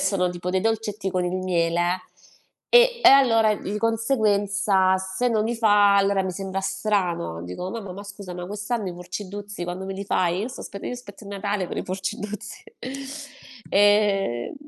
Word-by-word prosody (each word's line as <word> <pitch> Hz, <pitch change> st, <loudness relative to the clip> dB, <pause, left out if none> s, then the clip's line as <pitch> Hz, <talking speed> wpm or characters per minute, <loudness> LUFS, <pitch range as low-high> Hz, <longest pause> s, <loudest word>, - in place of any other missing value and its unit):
sono 180 Hz, -3 st, +1 dB
tipo 175 Hz, 0 st, -4 dB
dei 185 Hz, 0 st, +1 dB
dolcetti 215 Hz, -3 st, -1 dB
con 180 Hz, -1 st, 0 dB
il 175 Hz, -, -2 dB
miele 175 Hz, 0 st, 0 dB, 0.7 s
e 485 Hz, 0 st, +6 dB
e -, -, +9 dB
allora 225 Hz, -6 st, +6 dB
di 205 Hz, +2 st, -4 dB
conseguenza 205 Hz, -5 st, +2 dB
se 190 Hz, +6 st, -2 dB
non 215 Hz, -2 st, +1 dB
li 235 Hz, +1 st, -1 dB
fa, 205 Hz, -3 st, +5 dB
allora 195 Hz, 0 st, +3 dB
mi 185 Hz, -, -2 dB
sembra 195 Hz, +1 st, -4 dB
strano, 190 Hz, -, -1 dB
dico: 90 Hz, -, -5 dB
"Mamma, 205 Hz, -5 st, -6 dB
ma 200 Hz, +2 st, -9 dB
scusami 190 Hz, -3 st, -8 dB
quest'anno 205 Hz, +1 st, -3 dB
i -, -, -5 dB
Purceddhruzzi 195 Hz, +2 st, -6 dB
quando 180 Hz, +2 st, -5 dB
me 195 Hz, -, -4 dB
li 200 Hz, -, -5 dB
fai?" 180 Hz, -2 st, +1 dB
Io 225 Hz, -, -2 dB
sto 265 Hz, -, -9 dB
aspe 200 Hz, -, -7 dB
io 250 Hz, -, -5 dB
aspetto 215 Hz, -4 st, -10 dB
il 200 Hz, -, -9 dB
Natale 200 Hz, -1 st, -2 dB
per -, -, -6 dB
i -, -, -2 dB
Purceddhruzzi. 195 Hz, +2 st, -5 dB, 1.1 s
Ehm, 200 Hz, -, +3 dB
200 Hz, 170 wpm, -24 LUFS, 185-210 Hz, 1.1 s, e